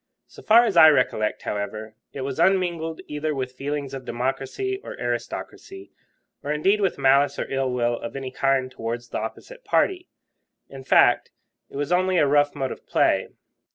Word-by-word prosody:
So - - -15
far 230 +2 +6
as 205 - -1
I 160 -1 +10
recollect, 120 -7 +1
however, 105 +1 -4 0.2
it 140 - -7
was 130 0 -4
unmingled 170 -4 +1
either 150 0 -3
with 130 -2 -3
feelings 140 +1 -4
of 135 -1 -6
democracy 135 - -3
or - - -7
aristocracy, 385 0 -5 0.5
or 145 - -4
indeed 195 +8 +2
with 195 - 0
malice 140 +1 +3
or - - -3
ill 135 -1 0
will 120 -1 0
of 115 - -7
any 135 -1 -5
kind 135 -1 0
towards 120 -1 -5
the - - -3
opposite - - -8
party. 365 -5 0 0.6
In 135 -1 -10
fact, - - +4 0.4
it - - -14
was 145 +3 -3
only 185 +1 +2
a 150 - +4
rough 145 +1 +2
mode 135 -2 -3
of - - -10
play. - - +2
140 Hz, 175 wpm, -24 LUFS, 130-175 Hz, 0.6 s, I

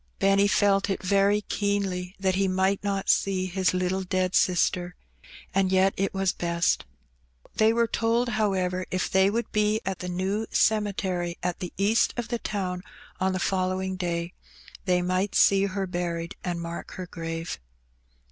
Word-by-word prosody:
Benny 195 +1 +4
felfc 200 -1 +2
it 195 - -2
very 200 +2 +3
keenly 195 -3 -2
that 190 -1 +1
he 195 +1 +1
might 190 +2 +1
not 200 -1 -2
see 190 -2 +2
his 185 0 +1
little 185 +1 0
dead 185 0 -1
sister, 180 0 +2 0.6
and 190 -1 +2
yet 190 +1 +4
it 195 +1 -1
was 195 -1 0
best. 170 0 0 0.7
They 220 0 +5
were 235 +1 +2
told, 230 +2 0
however, 190 -4 0
if 185 0 -1
they 190 +1 +4
would 230 +3 -2
be 210 0 +2
at 190 -1 -3
the 180 - -5
New 190 +5 -1
Cemetery 190 -5 0
at 180 -1 -2
the 180 -3 -5
east 205 +4 +2
of 235 -1 -3
the 235 -1 -2
town 185 -5 -3 0.4
on 190 0 +1
the - - -1
following 185 0 -1
day, 175 -1 -3 0.5
they 180 -2 +2
might 185 +2 0
see 195 0 +5
her 195 0 -2
buried, 175 -1 -3
and 175 -2 -2
mark 170 0 -6
her 185 - -6
grave. 165 -1 -5
190 Hz, 165 wpm, -26 LUFS, 180-200 Hz, 0.7 s, They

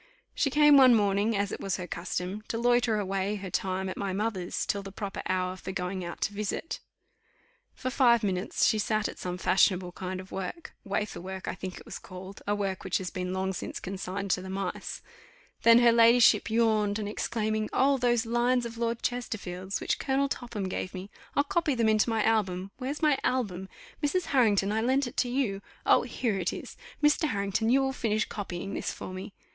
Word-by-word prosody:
She 280 - +1
came 295 0 +6
one 255 -3 +8
morning, 205 +1 +2
as 200 0 0
it - - -4
was 195 -2 -2
her 180 - -5
custom, 180 +3 -4
to 230 - -2
loiter 240 -1 +3
away 195 0 -1
her 195 -3 -6
time 190 +1 -1
at 185 - -5
my 195 -2 -2
mother's 195 -3 -2
till 200 - -1
the 195 0 -9
proper 200 0 -5
hour 185 0 0
for 185 - -6
going 185 0 -3
out 170 0 -7
to 205 - 0
visit. 210 +10 -3 1.0
For 255 - -3
five 240 -4 +4
minutes 190 -1 0
she 220 - +3
sat 215 0 +1
at - - -8
some 180 0 -4
fashionable 185 0 +3
kind 185 +1 -5
of 190 0 -10
work 195 - -5
wafer 200 0 -3
work, 190 +1 -7
I - - -1
think 185 -1 -6
it - - -12
was - - -7
called, 185 +2 -10
a 205 - +2
work 195 -2 -2
which 190 - 0
has 185 -1 -5
been 180 0 -3
long 190 +1 -1
since - - -5
consigned 195 +1 -4
to 185 - +1
the 190 - -8
mice; 195 +1 -4 0.6
then 230 0 +7
her 240 -1 +6
ladyship 230 0 +6
yawned, 215 -2 +2
and 210 -2 -3
exclaiming, 215 0 -1
"Oh, 275 +1 +3
those 240 -1 +2
lines 240 +1 +2
of 230 0 -7
Lord 235 0 -1
Chesterfield's, 195 -6 -3
which - - -1
Colonel 275 +1 +1
Topham 235 -7 -4
gave 185 0 -4
me; 190 +3 -7 0.2
I'll 285 - +4
copy 315 -2 0
them 230 -2 +2
into 215 +1 +3
my 225 -2 +1
album. 195 -4 0
Where's 280 +5 -4
my 295 -3 +4
album? 195 -7 -1 0.3
Mrs. 335 +5 +1
Harrington, 205 -6 +3
I 220 +1 +1
lent 265 +4 +2
it 245 - -7
to 245 - +1
you. 240 -7 -1 0.2
Oh! - - +6
here 220 -6 -2
it 180 - 0
is. - - -8 0.3
Mr. 300 +2 +4
Harrington, 200 +2 0
you 270 +2 +4
will 265 0 0
finish 215 -4 0
copying 195 -1 -5
this - - -2
for 185 - -7
me." 190 +2 -7
205 Hz, 205 wpm, -29 LUFS, 190-240 Hz, 1.0 s, one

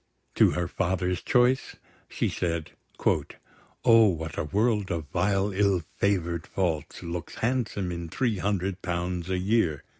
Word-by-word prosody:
To - - +5
her 90 -1 -1
father's 90 0 -1
choice, 125 +1 +2 0.3
she - - -1
said: 85 -2 -2 1.1
"O, 115 -1 +7
what 80 -4 -2
a - - -2
world 105 +3 +1
of 85 -3 -2
vile 95 +3 +1
ill 95 -3 +2
favour'd 85 -5 0
faults 85 -6 -2
Looks 85 -1 -5
handsome 110 -6 -1
in 85 -1 -5
three 115 0 0
hundred 95 -1 -1
pounds 90 0 -2
a 95 - +1
year!" 90 -6 +1
90 Hz, 140 wpm, -27 LUFS, 85-105 Hz, 1.1 s, O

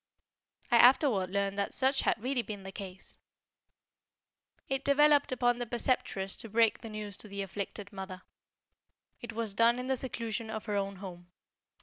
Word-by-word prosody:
I 240 - +7
afterward 240 - +5
learned 200 +1 -1
that 200 - -1
such 270 +1 +2
had - - +1
really 255 0 +1
been 205 -4 -7
the 190 - -7
case. 190 -1 -6 1.5
It 270 0 -1
developed 290 0 +4
upon 245 -1 +2
the 240 - -3
Preceptress 225 -5 0
to 225 - -5
break 225 +1 +3
the 225 - -7
news 210 -2 -5
to - - -6
the 200 -1 -4
afflicted 200 +1 -5
mother. 190 -1 -7 1.0
It 240 - -6
was 225 -2 -3
done 230 +3 +4
in 250 - -4
the 265 0 +1
seclusion 230 -3 -4
of 220 -1 -5
her 210 - -2
own 200 0 -1
home. 180 -2 -9
220 Hz, 165 wpm, -31 LUFS, 195-245 Hz, 1.5 s, I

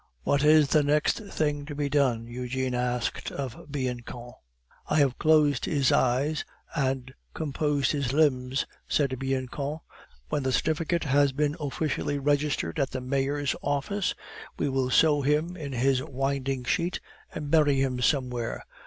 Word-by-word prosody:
"What 140 - +2
is 150 -1 +6
the 155 - +4
next 150 +6 +2
thing 150 -8 -2
to 145 - -6
be 145 0 -1
done?" 135 -5 +1
Eugene 125 +2 -3
asked 125 0 -2
of 135 +1 -6
Bianchon. 125 -3 -4 0.6
"I - - 0
have 140 -4 +2
closed 150 -3 +4
his 140 -4 +2
eyes 135 +5 +2 0.3
and 130 -3 -1 0.2
composed 145 -2 0
his 140 -5 -1
limbs," 135 -3 +2 0.2
said 135 -4 0
Bianchon. 135 +2 -2 0.5
"When 145 - 0
the 130 -1 0
certificate 160 +4 0
has 140 -1 +3
been 145 +1 0
officially 145 0 -2
registered 145 - 0
at 140 - +1
the 130 - -4
Mayor's 140 +2 0
office, 160 +8 -1 0.4
we - - 0
will 130 -1 0
sew 145 +2 +4
him 150 +5 +1
in 150 -5 -6
his 130 +1 +2
winding 135 -1 -2
sheet 170 +8 0 0.3
and 145 -1 -5
bury 150 -4 +4
him 130 -2 0
somewhere. 125 -4 0
140 Hz, 145 wpm, -27 LUFS, 130-150 Hz, 0.6 s, is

